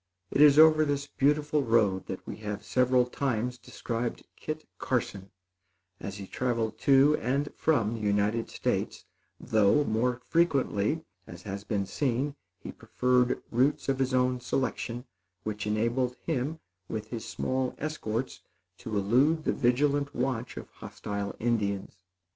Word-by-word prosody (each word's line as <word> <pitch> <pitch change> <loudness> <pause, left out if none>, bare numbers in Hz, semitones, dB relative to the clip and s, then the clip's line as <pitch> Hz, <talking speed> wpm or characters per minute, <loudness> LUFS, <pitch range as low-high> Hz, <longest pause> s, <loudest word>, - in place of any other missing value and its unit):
It - - +2
is 145 -1 +8
over 155 0 +7
this 145 -1 -1
beautiful 145 +2 +1
road 110 -6 +2
that 95 - -6
we - - -6
have 105 -1 -5
several 125 +3 +3
times 125 -1 -2
described 115 0 -4
Kit 155 0 -6
Carson 100 -6 -2 0.7
as 100 0 -6
he 100 - -7
traveled 115 0 -2
to 140 +2 +5
and 140 +4 -1
from 115 -9 +1
the 115 - -4
United 105 +2 0
States, - - -2 0.3
though, 110 +6 +3
more 120 +1 0
frequently, 155 -4 +1 0.2
as 90 0 -10
has 100 -1 -5
been 100 -1 -1
seen, 135 +5 -1 0.2
he - - -8
preferred 125 0 +1
routes 135 +4 +1
of 135 -1 0
his 130 0 +1
own 125 0 +2
selection, 125 -1 -2 0.4
which 105 -1 -4
enabled 115 +4 0
him, 155 +1 -2 0.3
with 110 -1 -4
his 115 -2 -5
small 130 -1 -2
escorts, 125 -9 -3 0.4
to 110 -2 -4
elude 130 +11 +3
the - - +1
vigilant 140 +3 +1
watch 125 -1 -2
of - - -7
hostile 100 -1 -5
Indians. 100 -4 -1
125 Hz, 140 wpm, -29 LUFS, 110-140 Hz, 0.7 s, is